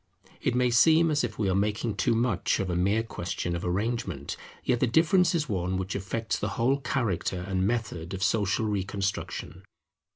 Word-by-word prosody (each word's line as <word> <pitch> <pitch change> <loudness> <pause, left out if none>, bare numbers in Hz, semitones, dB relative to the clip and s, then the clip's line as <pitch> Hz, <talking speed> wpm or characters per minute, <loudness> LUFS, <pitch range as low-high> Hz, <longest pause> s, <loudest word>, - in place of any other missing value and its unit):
It 125 - 0
may 125 0 +2
seem 160 +7 +5
as 150 -2 +1
if 110 -3 -3
we 105 - 0
are 95 - +2
making 105 +3 0
too 105 +4 +1
much 115 -6 +1
of 95 -2 -1
a - - -1
mere 100 +5 +2
question 85 -4 -3
of 85 - -4
arrangement; 95 - -2 0.3
yet 125 -2 +1
the 130 - +2
difference 170 +6 +4
is 155 -3 0
one 95 -4 -1
which 95 0 -3
affects 105 +4 -2
the - - -1
whole 130 +3 +3
character 105 -8 -1
and 95 0 0
method 100 -6 -2
of 95 - -3
social 105 +1 +1
reconstruction. 100 -1 -3
105 Hz, 185 wpm, -28 LUFS, 95-120 Hz, 0.3 s, seem